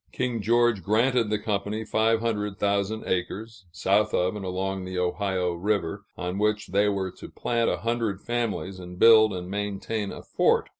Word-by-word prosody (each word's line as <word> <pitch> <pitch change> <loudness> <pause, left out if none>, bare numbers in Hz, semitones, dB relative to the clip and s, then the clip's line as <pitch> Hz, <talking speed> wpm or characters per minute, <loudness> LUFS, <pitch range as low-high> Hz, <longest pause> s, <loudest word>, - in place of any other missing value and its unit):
King 125 -3 -2
George 120 -1 +3
granted 115 +4 +2
the 105 - +1
company 105 +1 -2
five 110 +1 +2
hundred 105 -3 -2
thousand 100 +2 0
acres, 100 +3 -3
south 100 +7 +1
of 90 +3 +1
and 105 - -5
along 95 +1 -2
the 95 0 -5
Ohio 90 0 0
River, 100 +1 -1
on 90 +1 -3
which 105 0 0
they 100 +3 +3
were 95 -2 -2
to - - -11
plant 115 -1 0
a 90 - 0
hundred 115 0 -1
families 110 -5 -3
and 90 0 -9
build 110 0 +7
and 90 -2 -5
maintain 105 +1 -3
a - - -9
fort. - - +2
105 Hz, 170 wpm, -26 LUFS, 95-110 Hz, -, build